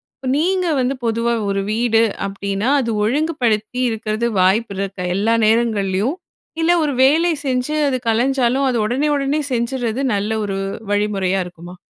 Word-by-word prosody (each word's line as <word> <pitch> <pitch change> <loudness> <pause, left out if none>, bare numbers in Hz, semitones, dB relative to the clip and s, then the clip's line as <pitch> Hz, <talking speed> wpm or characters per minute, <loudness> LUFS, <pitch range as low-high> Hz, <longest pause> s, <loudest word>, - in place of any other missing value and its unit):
இப்ப 265 - -8
நீங்க 365 +3 +1
வந்து 255 +2 0
பொதுவா 230 +1 0 0.2
ஒரு 195 0 0
வீடு 225 0 +2 0.2
அப்படின்னா 200 +3 -2
அது 230 -2 -2
ஒழுங்குபடுத்தி 245 -4 0
இருக்கறது 220 +1 -2
வாய்ப்புருக்கா, 195 -1 0
எல்லா 220 +4 +2
நேரங்கள்லயும்? 215 - +1 0.5
இல்ல, 330 - +3
ஒரு 295 -2 0
வேலை 320 +6 +4
செஞ்சு 255 +3 -1
அது 260 - 0
கலஞ்சாலும் 255 +3 +2
அத 250 - -1
உடனே 255 +7 0
உடனே 285 +2 0
செஞ்சுறது 240 +1 -1
நல்ல 200 +1 -2
ஒரு 195 -1 -3 0.3
வழிமுறையா 200 -2 0
இருக்குமா? 175 0 -11
230 Hz, 135 wpm, -19 LUFS, 205-265 Hz, 0.5 s, வேலை